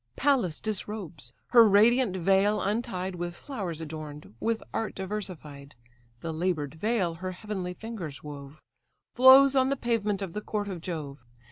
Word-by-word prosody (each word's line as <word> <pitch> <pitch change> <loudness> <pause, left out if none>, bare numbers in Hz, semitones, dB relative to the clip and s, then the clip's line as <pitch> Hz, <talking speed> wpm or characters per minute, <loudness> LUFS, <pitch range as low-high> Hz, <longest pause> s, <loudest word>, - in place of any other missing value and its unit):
Pallas 250 - +1
disrobes; 190 - -5 0.2
her 235 -2 +8
radiant 215 0 +4
veil 195 +4 +3
untied, 195 -3 -2
With 175 0 -5
flowers 185 - -5
adorn'd, 155 -4 -8
with 225 0 -1
art 225 -1 -2
diversified, 180 - -6 0.5
(The 165 -1 -4
laboured 160 -4 -1
veil 190 0 0
her 185 +3 -5
heavenly 185 -2 -5
fingers 180 - -7
wove,) 145 0 -10 0.5
Flows 265 +2 +8
on 260 0 +4
the 275 - +1
pavement 210 -5 -1
of 180 -4 -6
the 210 - -4
court 205 -1 -3
of 180 -4 -6
Jove. 150 -7 -6
190 Hz, 145 wpm, -28 LUFS, 160-220 Hz, 0.5 s, her